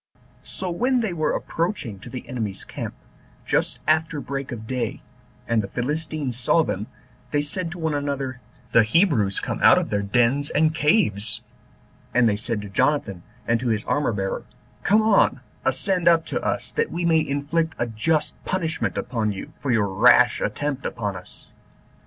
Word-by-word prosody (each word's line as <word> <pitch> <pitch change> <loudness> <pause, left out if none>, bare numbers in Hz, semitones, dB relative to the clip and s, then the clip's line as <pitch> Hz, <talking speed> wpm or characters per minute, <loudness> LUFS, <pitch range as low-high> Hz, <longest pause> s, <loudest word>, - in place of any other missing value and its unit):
So 185 -2 -3
when 250 +7 +1
they 215 -6 -1
were 155 -2 0
approaching 165 - -2
to 100 - -10
the 125 +1 -7
enemy's 110 -6 -3
camp, - - -6 0.5
just - - 0
after 155 -1 +2
break 140 -1 -5
of 110 -2 -6
day, 125 +1 -3 0.4
and 115 -1 +2
the 100 - -5
Philistines 145 +2 -3
saw 160 +6 +3
them, 105 -6 -3 0.4
they 145 +2 +1
said 170 +4 -3
one 160 -3 -1
to 145 - 0
another, 135 -3 -3 0.3
"The 115 - +6
Hebrews 110 - +2
come - - -3
out - - +7
of - - -1
their 105 -1 +1
dens 120 +7 +2
and 155 +1 +2
caves:" 150 - +2 0.7
and 125 -1 +5
they 105 - +2
said 110 0 -2
to 100 - -7
Jonathan 100 -4 +1 0.3
and 115 0 +2
to 125 - -3
his 110 -2 0
armor 145 -4 +1
bearer, 95 -2 -2 0.4
"Come 215 +2 +4
on, 200 - +3 0.2
ascend 175 +7 +1
up 165 -1 +5
to - - -2
us, - - -2
that 460 0 0
we 175 - -2
may 165 -1 +4
inflict 155 +2 -1
a 120 - 0
just 150 +7 0
punishment 165 -4 -2
upon 115 -4 -1
you, 100 +10 -7
for 140 - -4
your 110 -4 +3
rash 95 0 +5
attempt 145 -2 -2
upon 105 -3 -3
us." 90 - -13
140 Hz, 175 wpm, -24 LUFS, 110-160 Hz, 0.7 s, out